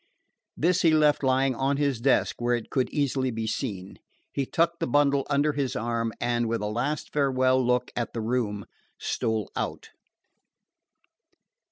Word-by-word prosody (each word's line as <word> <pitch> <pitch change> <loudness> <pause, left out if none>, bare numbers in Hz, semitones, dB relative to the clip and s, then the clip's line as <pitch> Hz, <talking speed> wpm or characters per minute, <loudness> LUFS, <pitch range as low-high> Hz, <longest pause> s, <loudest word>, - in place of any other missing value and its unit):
This 175 +3 +2
he 160 -3 +4
left 150 -1 +3
lying 130 0 +2
on 135 +3 0
his 140 -5 0
desk 135 +1 +2
where 120 0 +2
it 120 - -6
could 130 -2 +1
easily 135 -3 0
be 115 -2 -3
seen. 100 -5 -4 0.3
He 135 -2 -1
tucked 170 0 +1
the - - -1
bundle 140 +1 +2
under 145 +1 +2
his 140 -2 -2
arm, 115 +1 -1
and, 120 -1 0
with 115 -1 -1
a - - -2
last 120 +8 -2
farewell 130 -2 +2
look 125 0 +1
at 120 - -3
the 115 - -3
room, 110 -3 -1 0.3
stole 110 -2 -2
out. - - -4
130 Hz, 160 wpm, -26 LUFS, 115-140 Hz, 0.3 s, he